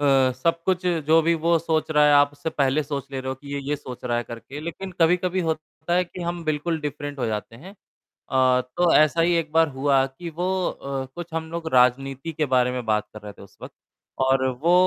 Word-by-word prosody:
अ, 135 -2 +4
सब 165 +6 -1
कुछ 185 -1 0 0.2
जो 160 +1 +6
भी 170 +1 +2
वो 170 +1 +3
सोच 160 -1 -1
रहा 150 -1 +4
है 145 - +5
आप 145 0 +5
उससे 145 +2 -5
पहले 140 +1 +1
सोच 140 -2 -5
ले 135 -1 -4
रहे 130 - -6
हो 130 - -2
कि 140 +2 -11
ये, - - -2
ये 150 - 0
सोच 125 -3 -10
रहा 120 -1 0
है 120 - 0
करके 120 +5 -9
लेकिन 180 +4 -6
कभी-कभी 180 +2 +2
होता 160 +2 -3
है 180 +1 +3
कि 180 +1 -10
हम 170 0 -3
बिल्कुल 155 +2 -1
डिफरेंट 145 -1 -5
हो 125 - -1
जाते 110 +1 -4
हैं 180 +10 -12 0.4
अ, 130 -1 +1
तो 165 +8 +1
ऐसा 155 +2 +4
ही 175 +1 +3
एक 165 -2 -1
बार 160 0 +4
हुआ 135 0 +3
कि 135 +6 -8
वो 175 +3 -3 0.2
अ, 135 -1 -5
कुछ 175 -1 -8
हम 160 0 -3
लोग 170 -1 -5
राजनीति 135 +4 +2
के 150 0 0
बारे 125 0 +3
में 125 -1 -4
बात 105 -1 0
कर 110 - -10
रहे 105 -1 -9
थे - - -16
उस 100 - -16
वक़्त - - -9 0.5
और 130 0 +2 0.2
वो 175 - +5
145 Hz, 240 wpm, -24 LUFS, 130-165 Hz, 0.5 s, जो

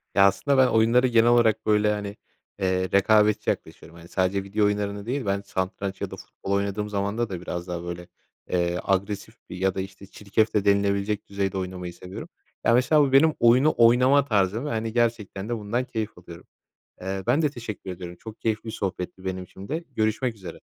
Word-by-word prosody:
Ya, 100 - +7
aslında 135 +8 +1
ben 130 -1 +6
oyunlara 115 +2 +4
genel 115 -1 +4
olarak 110 -2 +3
böyle, 105 0 +3
hani, 105 0 -4 0.4
eee, 95 -1 0
rekabetçi 105 +1 +3
yaklaşıyorum. 85 - -5
Hani, 85 - -13
sadece 95 +2 0
video 105 +2 0
oyunlarını 100 0 -1
değil, 130 +2 -2
ben 100 0 0
satranç 95 0 -4
ya - - -3
da - - -5
futbol 95 - -8
oynadığım 100 +1 -1
zaman 100 +1 -2
da 105 -7 -2
biraz 90 0 -5
daha, 85 -1 -4
böyle, 85 0 -6 0.4
eee, 90 0 0
agresif 100 +3 -1
bir - - -7
ya 95 0 0
da, 95 - -1
işte, 95 +1 -9
çirkef 105 +3 -1
de 105 -1 +1
denilebilecek 100 +1 +1
düzeyde 100 -1 -2
oynamayı 90 -1 -5
seviyorum. 90 +2 -9 0.4
Ya, 115 - +5
mesela 130 +5 +4
bu 140 -2 +2
benim 155 +4 +5
oyunu 125 +6 +5
oynama 125 +4 +5
tarzım 105 +1 +1
ve, - - -2
hani, 110 -3 -2
gerçekten 115 -3 -1
de 120 - -1
bundan 110 +4 -2
keyif 110 -5 -4
alıyorum. 85 -1 -12 0.6
Eee, 95 +1 -3
ben 150 - +3
de 150 - +2
teşekkür 115 -7 -7
ediyorum, 90 -1 -8
çok 110 0 -11
keyifli 110 -1 -1
bir 110 - -3
sohbetti 95 -2 -5
benim 95 0 -3
için 95 +2 -12
de. 160 +4 -3
Görüşmek 110 +2 0
üzere. 90 -5 -10
100 Hz, 195 wpm, -25 LUFS, 95-115 Hz, 0.6 s, Ya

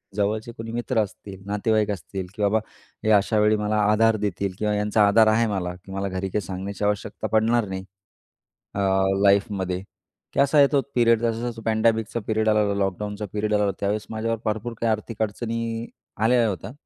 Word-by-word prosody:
जवळचे 105 +3 -1
कोणी 115 0 -6
मित्र 120 0 -1
असतील, 100 -1 -10
नातेवाईक 105 +1 +1
असतील 95 0 -5
की - - -6
बाबा 105 +2 +3 0.4
हे 110 - +2
अशावेळी 105 +1 +4
मला 105 0 0
आधार 110 +1 +4
देतील 100 -2 -2
किंवा 105 0 0
यांचा 105 0 +3
आधार 110 +2 +5
आहे 115 +2 +3
मला 90 -4 -2
की 95 - -12
मला 95 +1 -2
घरी 95 +1 -3
काही 105 - -1
सांगण्याची 95 +2 -5
आवश्यकता 105 +1 -2
पडणार 110 +1 +2
नाही. 95 0 -4 0.9
अ, - - -3 0.4
लाईफमध्ये. 100 -2 +2 0.5
की - - -2
असा 140 +2 +4
आहे 140 -1 +7
तो 140 -2 +3
पिरेड 115 -2 +4
जसा-जसा 115 0 -2
पॅडॅमिकचा 110 0 +1
पिरेड 110 0 +1
आलेला, 105 -1 +2
लॉकडाऊनचा 105 +2 -2
पिरेड 105 0 -1
आलेला, 105 -1 +2
त्यावेळेस 105 +1 -1
माझ्यावर 115 +1 -2
भरपूर 110 +2 -2
काही 115 - +2
आर्थिक 110 +1 -4
अडचणी 115 +1 -3 0.3
आलेल्या 115 +2 +3
होत्या. 95 +1 -5
105 Hz, 170 wpm, -24 LUFS, 100-115 Hz, 0.9 s, आहे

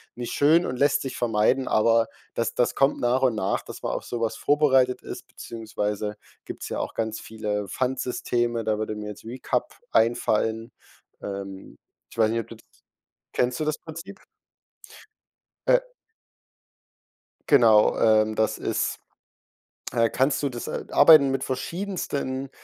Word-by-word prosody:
nicht 120 -1 -5
schön 160 +5 +4
und 125 - -3
lässt 145 +3 +3
sich 135 - -5
vermeiden, 120 +3 +1
aber 115 +1 +3 0.3
das 115 - -1
das 120 - +1
kommt 135 0 +2
nach 125 +2 +1
und 125 -4 +2
nach, 95 -2 -1
dass - - -10
man - - -2
auf - - -3
so 120 - -5
was 115 -1 -1
vorbereitet 135 -4 +3
ist, - - -8
beziehungsweise 105 -2 -4 0.3
gibt's - - -7
ja - - -3
auch - - -4
ganz 110 -1 -3
viele 105 -2 -4
Pfandsysteme, 120 -1 -1
da 110 -1 +1
würde 110 0 -3
mir 105 0 -6
jetzt 105 - -10
Recup 125 +1 -3 0.2
einfallen. 115 0 +1 0.5
Ähm, 100 -1 -7 0.3
ich - - -15
weiß 110 -1 +4
nicht, 115 +1 0
ob - - -13
du - - -10
das - - -22 0.7
kennst 125 0 +1
du 155 - -1
das 155 0 -1
Prinzip? 165 +5 -10 1.5
Äh - - +6 1.7
Genau, 115 -7 +5
ähm, 110 0 +3
das 110 0 +1
ist - - -2 0.9
äh, 115 -1 +3
kannst 135 +2 +1
du 140 - +1
das 120 -3 -6
äh, - - -4
arbeiten 145 -2 +7
mit 135 -1 -1
verschiedensten, 140 -4 -3
120 Hz, 150 wpm, -25 LUFS, 110-135 Hz, 1.7 s, arbeiten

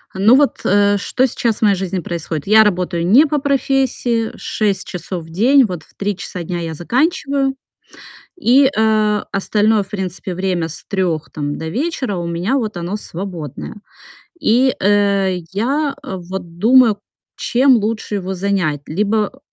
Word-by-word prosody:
Ну 205 +6 +5
вот, 285 0 +2
э, 205 +1 +3
что 255 +6 0
сейчас 230 -2 -1
в - - -24
моей 205 -2 +4
жизни 190 0 -3
происходит? 165 -2 -5
Я 220 +1 +7
работаю 180 -4 0
не 240 - +6
по 295 -1 0
профессии 265 -4 0
6 200 -3 -2
часов 180 -1 -5
в - - -15
день. 250 +10 +4
Вот 180 -6 -5
в - - -24
3 200 0 -2
часа 180 -2 -6
дня 175 +1 -4
я 165 -1 -4
заканчиваю 275 - 0 0.8
и, 270 -4 +4
а, 215 -1 +2
остальное, 210 +2 +1
в 195 - -20
принципе, 190 -2 -5
время 180 -2 -1
с 160 - -8
3 180 -6 -2
там 145 -1 -4
до 160 - -5
вечера- 260 - -2
у 175 - -3
меня 175 +9 -1
вот 215 -7 -3
оно 175 +4 -3
свободное. 175 - -7 0.7
И, 255 +4 +3
э, 200 -2 +2
я 275 +8 0
вот 180 -5 -7
думаю, 230 0 +5 0.4
чем 260 +1 +3
лучше 215 -1 -2
его 190 -1 -4
занять: 185 -6 -1
либо 210 - -1
205 Hz, 155 wpm, -18 LUFS, 180-235 Hz, 0.8 s, Я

